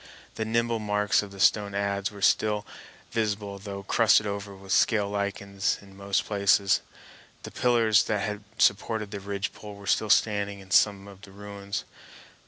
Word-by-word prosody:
The 110 Hz, -, -3 dB
nibble 115 Hz, +1 st, 0 dB
marks 105 Hz, -4 st, +1 dB
of 100 Hz, -, -8 dB
the 100 Hz, 0 st, -12 dB
stone 100 Hz, +1 st, +3 dB
adze 100 Hz, 0 st, -1 dB
were 100 Hz, -1 st, -9 dB
still 105 Hz, -1 st, +2 dB, 0.5 s
visible, 105 Hz, -3 st, -2 dB
though 100 Hz, -1 st, -7 dB
crusted 110 Hz, +1 st, +4 dB
over 100 Hz, -1 st, -5 dB
with 95 Hz, 0 st, -11 dB
scale 105 Hz, -1 st, +3 dB
lichens 100 Hz, -1 st, -2 dB
in 100 Hz, -1 st, -16 dB
most 100 Hz, 0 st, -1 dB
places. 100 Hz, -1 st, +3 dB, 0.6 s
The -, -, -8 dB
pillars 115 Hz, -4 st, +3 dB
that 105 Hz, -2 st, -1 dB
had 105 Hz, 0 st, -4 dB
supported 105 Hz, 0 st, +1 dB
the 100 Hz, -, -5 dB
ridgepole 100 Hz, +1 st, -5 dB
were 100 Hz, 0 st, -12 dB
still 110 Hz, +2 st, +1 dB
standing 100 Hz, -2 st, +2 dB
in 95 Hz, -1 st, -15 dB
some 100 Hz, +1 st, +3 dB
of 100 Hz, -1 st, -13 dB
the 100 Hz, -, -13 dB
ruins. 100 Hz, 0 st, -6 dB
100 Hz, 165 wpm, -27 LUFS, 100-105 Hz, 0.6 s, crusted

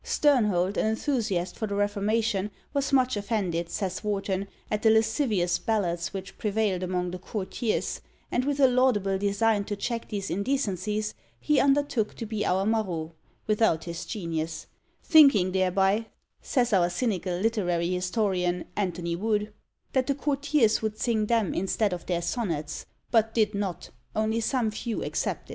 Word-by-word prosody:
Sternhold, 210 Hz, -10 st, +2 dB
an -, -, +2 dB
enthusiast 220 Hz, -6 st, -1 dB
for 220 Hz, -, -3 dB
the 200 Hz, -, -3 dB
Reformation, 205 Hz, 0 st, 0 dB, 0.2 s
was 280 Hz, 0 st, 0 dB
much 255 Hz, -2 st, +3 dB
offended, 195 Hz, -5 st, -1 dB
says 190 Hz, +1 st, -3 dB
Warton, 200 Hz, -2 st, -1 dB, 0.2 s
at 210 Hz, 0 st, 0 dB
the 225 Hz, -, +5 dB
lascivious 220 Hz, -5 st, +2 dB
ballads 185 Hz, -5 st, -1 dB
which 195 Hz, 0 st, -7 dB
prevailed 210 Hz, -3 st, 0 dB
among 180 Hz, -1 st, -1 dB
the 180 Hz, -, -6 dB
courtiers, 210 Hz, +4 st, -2 dB, 0.3 s
and, 245 Hz, -, +1 dB
with 285 Hz, +1 st, -1 dB
a 275 Hz, -, +7 dB
laudable 235 Hz, -7 st, +2 dB
design 205 Hz, +1 st, +2 dB
to 205 Hz, -, -3 dB
check 230 Hz, +3 st, -3 dB
these 200 Hz, -5 st, -3 dB
indecencies, 210 Hz, -1 st, -1 dB, 0.3 s
he 300 Hz, -2 st, +2 dB
undertook 275 Hz, -6 st, +2 dB
to 230 Hz, -, -5 dB
be 215 Hz, -1 st, -2 dB
our 190 Hz, +2 st, +1 dB
Marot 185 Hz, -8 st, -1 dB, 0.3 s
without 215 Hz, -6 st, +2 dB
his 170 Hz, +1 st, -5 dB
genius: 165 Hz, -6 st, -3 dB, 0.4 s
"thinking 275 Hz, -, +6 dB
thereby," 190 Hz, +3 st, +2 dB, 0.3 s
says 245 Hz, -4 st, +1 dB
our 175 Hz, -3 st, +4 dB
cynical 185 Hz, -3 st, -1 dB
literary 180 Hz, -5 st, 0 dB
historian, 180 Hz, -1 st, 0 dB
Antony 175 Hz, -4 st, -2 dB
Wood, 210 Hz, +2 st, -1 dB, 0.4 s
"that 260 Hz, -1 st, +2 dB
the 280 Hz, -, +1 dB
courtiers 280 Hz, -5 st, +2 dB
would 215 Hz, -1 st, -2 dB
sing 220 Hz, -3 st, 0 dB
them 225 Hz, -4 st, +1 dB
instead 195 Hz, +2 st, 0 dB
of 175 Hz, -, -6 dB
their 175 Hz, -1 st, -1 dB
sonnets, 165 Hz, -, -3 dB, 0.2 s
but 225 Hz, -1 st, +3 dB
did 220 Hz, -2 st, +2 dB
not, 200 Hz, -4 st, -4 dB, 0.2 s
only 220 Hz, +1 st, +1 dB
some 230 Hz, -1 st, 0 dB
few 225 Hz, +1 st, -3 dB
excepted." -, -, -3 dB
210 Hz, 150 wpm, -27 LUFS, 185-225 Hz, 0.4 s, a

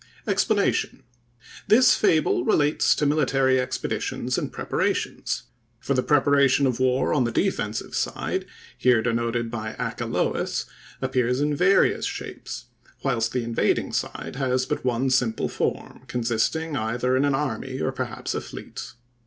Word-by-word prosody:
EXPLANATION.—This 120 Hz, -, +1 dB
fable 155 Hz, -, +2 dB
relates 145 Hz, +3 st, +3 dB
to 150 Hz, -, 0 dB
military 135 Hz, -3 st, +2 dB
expeditions 125 Hz, -, -2 dB
and -, -, -2 dB
preparations; -, -, -2 dB, 0.4 s
for 140 Hz, -, -1 dB
the 130 Hz, -, +2 dB
preparation 140 Hz, -1 st, +4 dB
of 125 Hz, -2 st, 0 dB
war 130 Hz, 0 st, +2 dB
on 130 Hz, -, +3 dB
the 120 Hz, -, -1 dB
defensive -, -, -1 dB
side, -, -, -2 dB, 0.3 s
here 125 Hz, -3 st, +3 dB
denoted 115 Hz, 0 st, -1 dB
by 110 Hz, -2 st, -4 dB
Achelous, 65 Hz, +1 st, -1 dB, 0.4 s
appears 125 Hz, -1 st, +1 dB
in 145 Hz, 0 st, +1 dB
various 185 Hz, +6 st, +3 dB
shapes, -, -, -7 dB, 0.4 s
whilst 115 Hz, 0 st, 0 dB
the 125 Hz, -1 st, -1 dB
invading 115 Hz, 0 st, 0 dB
side -, -, -3 dB
has 130 Hz, -1 st, +1 dB
but -, -, -3 dB
one 130 Hz, +1 st, +1 dB
simple 125 Hz, -4 st, +1 dB
form, -, -, -3 dB
consisting 125 Hz, +7 st, -1 dB
either 120 Hz, +2 st, 0 dB
in 130 Hz, -, +2 dB
an 140 Hz, -1 st, +2 dB
army, 135 Hz, -2 st, -3 dB
or 135 Hz, -, 0 dB
perhaps 130 Hz, -4 st, -4 dB
a -, -, -2 dB
fleet. -, -, -8 dB
130 Hz, 135 wpm, -25 LUFS, 120-140 Hz, 0.4 s, preparation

